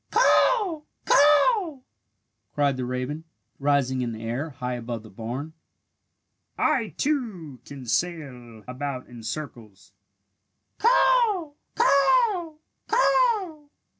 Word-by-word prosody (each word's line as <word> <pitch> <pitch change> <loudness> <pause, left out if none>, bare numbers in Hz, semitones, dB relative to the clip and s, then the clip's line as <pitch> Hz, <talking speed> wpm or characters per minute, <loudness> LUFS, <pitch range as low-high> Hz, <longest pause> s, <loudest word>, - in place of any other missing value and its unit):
"Caw! 400 -11 +3 0.2
Caw!" 305 - +4 0.7
cried 145 -2 +2
the 130 -1 -4
raven, 130 +5 -4 0.4
rising 140 -2 +1
in 120 -2 -3
the 110 0 -8
air, 120 +8 -3
high 125 -3 -5
above 120 -2 -5
the 110 - -14
barn. 125 +9 -6 1.0
"I, 230 -5 0
too, 210 - -3
can 135 -3 -10
sail 125 -4 -3
about 130 0 -5
in 120 -2 -12
circles! 110 -7 -8 0.9
Caw! 465 -8 +3 0.2
Caw! 395 - +3 0.3
Caw!" 445 -11 +1
150 Hz, 100 wpm, -25 LUFS, -, 1.0 s, Caw